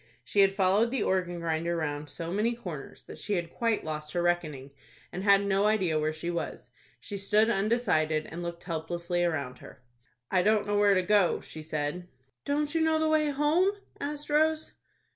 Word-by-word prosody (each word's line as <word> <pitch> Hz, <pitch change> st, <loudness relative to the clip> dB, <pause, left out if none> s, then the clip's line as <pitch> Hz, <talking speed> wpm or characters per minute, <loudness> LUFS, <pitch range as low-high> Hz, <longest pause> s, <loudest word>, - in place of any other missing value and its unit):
She 200 Hz, -, -1 dB
had 195 Hz, -1 st, +6 dB
followed 195 Hz, +4 st, +3 dB
the 255 Hz, -3 st, -1 dB
organ 180 Hz, -2 st, 0 dB
grinder 170 Hz, +1 st, -1 dB
round 150 Hz, -2 st, -3 dB
so 165 Hz, +4 st, -5 dB
many 220 Hz, +4 st, +1 dB
corners 170 Hz, -, -8 dB
that -, -, -11 dB
she 210 Hz, -, -2 dB
had 170 Hz, -3 st, -2 dB
quite 230 Hz, -5 st, 0 dB
lost 150 Hz, -1 st, -4 dB
her 175 Hz, -, 0 dB
reckoning, 155 Hz, -6 st, -1 dB, 0.4 s
and 185 Hz, -, -5 dB
had 200 Hz, 0 st, +5 dB
no 200 Hz, +1 st, +2 dB
idea 185 Hz, -8 st, +2 dB
where 155 Hz, +1 st, 0 dB
she 160 Hz, +2 st, -4 dB
was. 170 Hz, -, -5 dB, 0.3 s
She 205 Hz, -, -6 dB
stood 210 Hz, +3 st, +3 dB
undecided 195 Hz, -8 st, +1 dB
and 170 Hz, +2 st, -6 dB
looked 170 Hz, 0 st, -6 dB
helplessly 170 Hz, +1 st, -2 dB
around 140 Hz, -7 st, -2 dB
her. 130 Hz, -, -14 dB, 0.5 s
"I 185 Hz, -, +4 dB
don't 215 Hz, +2 st, +3 dB
know 205 Hz, 0 st, 0 dB
where 205 Hz, -1 st, +5 dB
to 185 Hz, -, +2 dB
go," 205 Hz, -2 st, +3 dB
she 155 Hz, -, -8 dB
said. 155 Hz, +3 st, -3 dB, 0.4 s
"Don't 295 Hz, +1 st, 0 dB
you 325 Hz, -, +1 dB
know 320 Hz, 0 st, +3 dB
the 315 Hz, 0 st, +1 dB
way 310 Hz, -1 st, +3 dB
home?" 300 Hz, +7 st, +2 dB, 0.3 s
asked 295 Hz, +1 st, -4 dB
Rose. 315 Hz, +1 st, +2 dB
185 Hz, 190 wpm, -29 LUFS, 160-220 Hz, 0.5 s, had